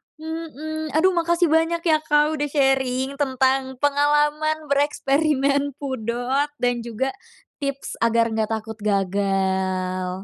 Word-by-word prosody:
Mhm. 315 -1 -6
Aduh 370 +4 +4
makasih 340 0 +2
banyak 330 +1 +2
ya, 320 -3 +4
Kak, 300 -1 +3
udah 295 - -1
sharing 270 -1 +1
tentang 265 -1 +1
pengalaman 295 +2 +2
bereksperimen 280 -1 +1
pudot 260 +1 -1
dan 245 -1 +1
juga 240 +3 -2 0.5
tips 275 -1 -4
agar 230 0 +3
enggak 220 0 -1
takut 220 0 -5
gagal. 190 -2 -1
275 Hz, 110 wpm, -23 LUFS, 230-300 Hz, 0.5 s, Aduh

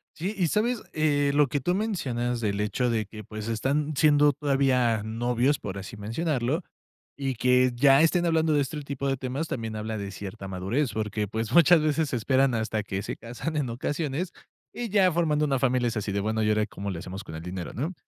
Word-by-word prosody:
Sí, 190 +6 -3
¿y 175 -3 +2
sabes? 225 +5 0
Eh, 145 -2 +2
lo 145 0 +4
que 145 - -1
tú 175 +7 +1
mencionas 125 - -1
del 100 -2 -1
hecho 120 +4 0
de 110 -2 0
que, 105 +2 -10
pues, 110 +1 -7
están 140 +7 0
siendo 145 0 +5
todavía 135 -5 +2
novios, 120 +5 0
por 100 -1 -6
así 100 +3 -7
mencionarlo, 130 - -1 0.6
y 135 -2 -2
que 125 +1 +3
ya 135 +3 +6
estén 175 +2 +3
hablando 160 -2 +2
de 145 - +3
este 150 +2 -3
tipo 140 -1 -4
de 135 0 0
temas, 130 +5 -3
también 115 -5 -4
habla 110 +1 -4
de 100 -1 -5
cierta 100 +2 -7
madurez, 100 +8 -1
porque, 105 -1 -2
pues, 110 +2 -3
muchas 170 0 +7
veces 155 0 +1
se - - -2
esperan 130 +3 +2
hasta 110 -1 -1
que 100 -2 -3
se - - -5
casan 120 +7 -5
en 140 -5 -1
ocasiones, 145 +7 -2 0.4
y 240 -1 -4
ya 195 -2 +4
formando 155 -3 +1
una 135 -3 +1
familia 125 -2 +2
es 115 - -4
así 105 -1 -2
de, 100 - 0
bueno, 110 +1 0
¿y 105 - +2
ahora 105 0 +2
cómo 100 -1 -5
le 85 - -5
hacemos 95 +3 -7
con 80 - -9
el 80 - -7
dinero?, 90 0 -5
¿no?, 150 +10 -3
130 Hz, 215 wpm, -27 LUFS, 110-150 Hz, 0.6 s, muchas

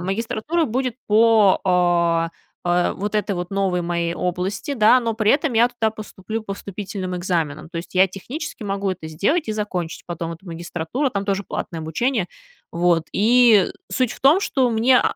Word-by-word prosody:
магистратура 230 - -1
будет 255 -1 -1
по 180 -6 +3 0.3
э, 175 - 0
э, 175 0 +2
вот 205 +2 -4
этой 210 -1 0
вот 175 0 -4
новой 195 -3 0
моей 170 0 -1
области, 180 +10 -3
да, 230 +2 +6
но 230 -2 -1
при 215 -1 +2
этом 285 -1 +2
я 235 +1 +4
туда 235 -3 -1
поступлю 215 0 -6
по 200 -2 -5
вступительным 195 -2 -6
экзаменам, 165 -4 -2
то 170 - -9
есть 170 +3 -7
я 185 +1 +6
технически 250 - -7
могу 195 -1 -2
это 165 -4 -8
сделать 220 - 0
и - - 0
закончить 185 -6 -4
потом 170 -1 -4
эту 165 +4 -13
магистратуру, 170 - -3
там 200 -2 -2
тоже 200 -1 0
платное 170 -2 -5
обучение, 195 - -1 0.4
вот. 170 -1 +2
И 225 -2 +5 0.2
суть 255 -3 0
в - - -13
том, 290 +8 +5
что 265 -10 +1
мне, 240 +3 +4
200 Hz, 175 wpm, -21 LUFS, 175-230 Hz, 0.4 s, да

